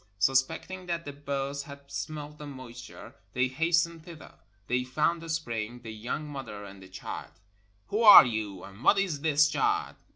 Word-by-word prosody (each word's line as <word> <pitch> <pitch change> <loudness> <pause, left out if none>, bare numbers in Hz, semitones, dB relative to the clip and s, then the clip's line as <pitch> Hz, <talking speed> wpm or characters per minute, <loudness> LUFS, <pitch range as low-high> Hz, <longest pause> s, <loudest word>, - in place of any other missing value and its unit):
Sus 130 +6 +5
pecting 180 +6 -8
that 170 -1 -2
the 145 - -6
birds 140 0 -3
had 140 0 -11
smelt 150 -1 -6
the 150 - -8
moisture, 125 -4 -10 0.2
they 125 +1 +2
hastened 165 +4 +1
thither. 165 -2 -12 0.3
They 125 +1 0
found 155 +6 0
the 165 - -9
spring, 120 -7 -3
the 110 -1 -7
young 120 +8 -4
mother, 120 -8 -7
and 100 -1 -12
the 95 - -13
child. 95 - -7 0.6
"Who 210 +3 0
are 210 -9 +11
you, 110 -5 -4
and 100 +5 -12
what 205 - +5
is 180 -8 0
this 150 -1 +4
child?" 150 -2 0
140 Hz, 175 wpm, -29 LUFS, 120-160 Hz, 0.6 s, are